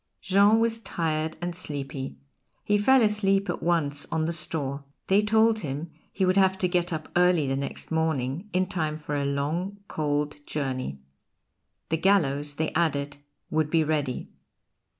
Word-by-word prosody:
Jean 200 +3 +4
was 225 0 +1
tired 160 -6 -2
and 175 0 -3
sleepy. 140 -5 -5 0.5
He 205 0 +2
fell 260 +4 +5
asleep 200 -3 +2
at - - -6
once 145 -4 +1
on 160 -1 0
the 170 - -1
straw. 150 -3 -2 0.2
They 195 +2 +4
told 220 +1 +3
him 150 0 -5 0.2
he 190 - 0
would 185 +1 +2
have 190 -1 +4
to 185 - +1
get 175 0 0
up 155 -1 -4
early 180 -3 +4
the 135 0 0
next 140 +3 -4
morning, 160 +2 -1
in 185 0 +2
time 155 -4 -2
for 150 -1 -6
a 140 -1 0
long, 155 +8 -2
cold 145 -1 -2
journey. 130 - -3 0.9
The 160 - +1
gallows, 150 -6 +2
they 160 +1 -2
added, 145 -4 0 0.3
would 155 -1 +1
be 160 0 +3
ready. 145 -4 -2
160 Hz, 160 wpm, -26 LUFS, 145-190 Hz, 0.9 s, fell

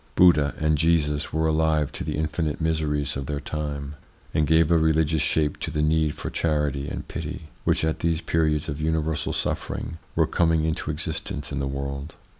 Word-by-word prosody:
Buddha 75 -5 +5
and 75 -1 +1
Jesus 80 -2 +2
were 80 +1 +1
alive 80 -2 +2
to - - -5
the - - -2
infinite 75 0 -1
miseries 75 -3 0
of 70 -1 -4
their 75 -1 -2
time, 70 -1 -4 0.4
and 75 -1 +2
gave 80 +1 +4
a 85 - +6
religious 80 -1 +2
shape 75 -2 +1
to - - -3
the 75 -2 0
need 80 -1 +2
for - - -5
charity 75 -3 0
and - - -6
pity, 80 0 -6 0.2
which, - - +2
at 80 - -1
these 85 -1 +1
periods 75 -3 +1
of 75 0 -4
universal 80 -1 0
suffering, 80 - -3 0.2
were - - +4
coming 80 -2 +2
into 80 -1 -2
existence 75 -2 -4
in 70 - -2
the 70 - -1
world. 70 +2 -4
75 Hz, 185 wpm, -25 LUFS, 75-80 Hz, 0.4 s, a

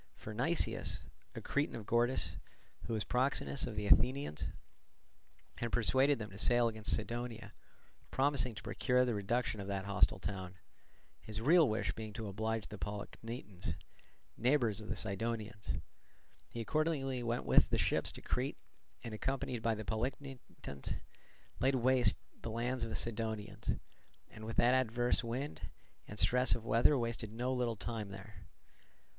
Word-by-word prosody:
For 105 - -8
Nicias, 160 +10 0 0.3
a - - -5
Cretan 145 +1 0
of 110 -3 -6
Gortys, 120 +4 +2 0.5
who 115 - -2
was 110 -2 0
proxenus 135 +2 +1
of 115 - -5
the 105 0 -2
Athenians, 125 - +3 1.1
had 120 -1 -1
persuaded 130 +4 +4
them 105 -2 -6
to 100 - -9
sail 120 -1 +4
against 110 -1 0
Cydonia, 115 -1 -4 0.6
promising 130 -4 +2
to 105 - -8
procure 125 +6 +2
the 120 - 0
reduction 110 +1 0
of 100 - -6
that 100 -1 -2
hostile 100 -2 +3
town; 95 -1 -5 0.7
his 110 0 -4
real 155 +5 +6
wish 105 -2 0
being 110 0 -6
to 110 0 -4
oblige 110 +2 -1
the 105 - -8
Polichnitans, 105 -3 -5 0.6
neighbours 120 -4 +2
of 110 - -9
the 110 - -1
Cydonians. 105 - -2 0.7
He 115 - -4
accordingly 135 -1 0
went 120 0 -1
with - - +6
the - - +2
ships - - +2
to - - -10
Crete, - - -1 0.5
and, 115 - -5
accompanied 130 +1 -2
by 115 0 +2
the 110 0 -6
Polichnitans, 125 - -4 0.6
laid 135 +1 +3
waste 125 -3 +4 0.2
the - - -4
lands 120 +3 -1
of 115 - -2
the - - -3
Cydonians; 110 -2 -2 0.6
and, 110 - -9
what 115 - -5
with - - +6
adverse 120 -1 +3
winds 125 +5 -3 0.5
and 105 - -8
stress 125 +3 +4
of 115 -1 -7
weather 115 +6 +5
wasted 115 -2 -2
no 125 +3 -1
little 120 -2 0
time 110 -1 -4
there. 100 0 -10
115 Hz, 150 wpm, -35 LUFS, 105-125 Hz, 1.1 s, real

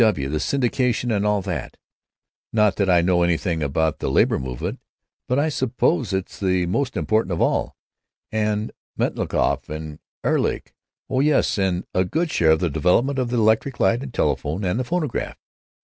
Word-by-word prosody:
W. 75 -12 +1
and 75 - -1
syndicalism 125 -2 0
and 105 -1 +1
all 105 -2 +1
that—not 100 +3 -4
that 100 -2 +1
I 90 -1 +5
know 90 0 +3
anything 85 -1 0
about 75 +2 0
the - - -2
labor 65 - +3
movement, 65 -2 -4 0.5
but 125 - +1
I 145 +2 +2
suppose 130 - 0
it's 95 -1 -3
the 95 -2 +1
most 130 +9 -1
important 110 -4 +1
of 85 - -2
all. - - 0 0.6
And 105 0 -1 0.3
Metchnikoff - - 0
and 75 0 -6 0.2
Ehrlich. - - 0 0.3
Oh 130 - 0
yes, 145 -6 +2
and 95 -2 0
a 95 - +3
good 160 - -1
share 80 - +3
of 80 - -1
the 90 - +1
development 105 - +2
of 125 -2 -1
the 120 - -1
electric 110 +4 +2
light 115 +2 +3
and 135 -2 -6
telephone 80 -4 -1
and 90 +5 0
the - - 0
phonograph.... 155 -2 -2
105 Hz, 170 wpm, -22 LUFS, 85-125 Hz, 0.6 s, I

